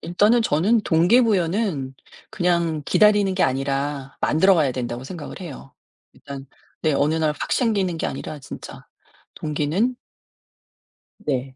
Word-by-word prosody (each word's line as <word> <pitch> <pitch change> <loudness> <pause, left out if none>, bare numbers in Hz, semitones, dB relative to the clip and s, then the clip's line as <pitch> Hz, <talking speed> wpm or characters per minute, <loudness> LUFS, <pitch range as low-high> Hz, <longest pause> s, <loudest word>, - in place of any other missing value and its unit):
일단은 210 +7 +3
저는 205 +6 +2
동기부여는 180 - +2 0.4
그냥 170 -6 0
기다리는 205 -3 +4
게 185 - +1
아니라 135 +1 -1
만들어가야 160 -4 +3
된다고 120 0 -4
생각을 165 +4 -8
해요. 145 -5 -9 0.4
일단 140 -1 -10 0.4
네 155 - +2
어느 145 +2 +2
날 160 -1 +1
확 - - -3
생기는 200 -8 +1
게 - - -2
아니라 150 +3 -6
진짜 130 - -10 0.5
동기는 155 +11 -1 1.2
네. 130 -2 -3
160 Hz, 275 characters per minute, -22 LUFS, 140-195 Hz, 1.2 s, 기다리는